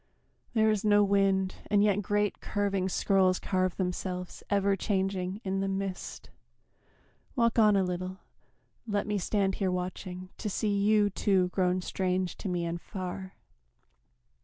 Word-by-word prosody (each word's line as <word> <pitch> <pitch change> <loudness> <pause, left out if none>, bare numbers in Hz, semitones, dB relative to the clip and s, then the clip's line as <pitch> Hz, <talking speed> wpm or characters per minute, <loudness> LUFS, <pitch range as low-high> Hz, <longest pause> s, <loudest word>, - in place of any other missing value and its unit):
There 220 -1 +4
is 210 0 0
no 205 -1 +5
wind, 195 -1 +2
and 205 -1 +4
yet 205 -1 +3
great 205 +1 0
curving 200 -2 -1
scrolls 185 0 +3
Carve 185 -2 0
themselves, 180 -1 -3
ever 200 -1 +2
changing, 190 0 -1
in 195 0 -1
the 195 - 0
mist. 195 -1 -4 1.0
Walk 235 -2 +2
on 210 -2 +6
a 195 - +3
little, 185 +1 -3 0.7
let 205 -2 0
me 210 -1 -1
stand 195 +1 +1
here 190 - +2
watching 180 0 -4
To 215 - -2
see 205 +1 0
you, 205 0 +3
too, 190 -2 +2
grown 185 0 +1
strange 185 0 -1
to 195 - -4
me 175 -1 -1
and 170 0 -3
far. 190 0 -6
195 Hz, 145 wpm, -29 LUFS, 185-205 Hz, 1.0 s, on